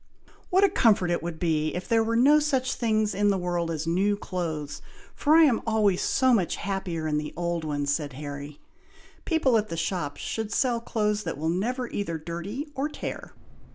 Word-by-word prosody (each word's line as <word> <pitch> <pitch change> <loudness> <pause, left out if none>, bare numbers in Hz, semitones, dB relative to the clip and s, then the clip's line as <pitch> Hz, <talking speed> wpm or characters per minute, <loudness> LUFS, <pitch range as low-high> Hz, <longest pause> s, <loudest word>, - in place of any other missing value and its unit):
"What 380 +2 +4
a 400 - +6
comfort 205 - +3
it 175 - 0
would 170 -1 -5
be, 155 -2 0
if 180 - -4
there 230 -1 +3
were 230 +1 -1
no 285 +6 +6
such 270 -4 0
things 215 -3 0
in 205 +2 +2
the 195 - +2
world 175 -2 -1
as 160 -1 -3
'new 195 +5 +1
clothes,' 160 -7 -4 0.3
for 305 +1 +3
I 330 - +8
am 265 -7 +3
always 210 -4 +2
so 260 -1 +3
much 190 -7 +1
happier 180 -4 -3
in 150 -1 +1
the 150 - -6
old 170 -1 -1
ones," 145 -2 -1
said 145 -3 -3
Harry. 145 +1 -7 0.7
"People 275 -9 +3
at 215 - -4
the 165 - -4
shops 165 -3 -2
should 220 -1 -4
sell 240 0 +1
clothes 210 -3 0
that 210 - -4
will 160 +2 -1
never 240 +9 -1
either 170 -8 -3
dirty 170 - -5
or 275 +2 -2
tear!" - - -6
195 Hz, 195 wpm, -26 LUFS, 165-230 Hz, 0.7 s, I